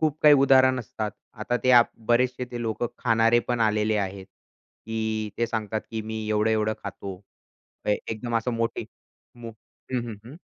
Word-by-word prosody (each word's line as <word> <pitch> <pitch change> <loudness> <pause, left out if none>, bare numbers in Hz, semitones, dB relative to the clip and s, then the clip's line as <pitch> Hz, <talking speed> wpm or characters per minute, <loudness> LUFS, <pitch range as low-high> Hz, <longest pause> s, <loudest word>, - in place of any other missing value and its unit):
खूप 155 -1 +1
काही 150 -1 +8
उदाहरण 130 -1 +5
असतात. 110 -1 -4 0.2
आता 120 +2 -1
ते 130 - +5
आप 120 -1 +6 0.2
बरेचसे 125 +1 +2
जे 120 - -5
लोकं 115 +1 -1
खाणारे 115 +1 +3
पण 120 -1 0
आलेले 110 -1 +2
आहेत, 95 -1 -3 0.6
की 110 -1 -2
ते 115 - +2
सांगतात 110 -1 -2
की 110 - -3
मी 110 0 -5
एवढं-एवढं 110 0 +2
खातो. 100 -1 -6 0.7
अ, - - -5 0.2
एकदम 115 +1 -2
असं 115 +2 -1
मोठे 115 0 -2 0.5
मो 120 -1 -8 0.4
हं, 125 - +1
हं, 110 - -5
हं. 140 +6 -10
115 Hz, 165 wpm, -25 LUFS, 110-120 Hz, 0.7 s, काही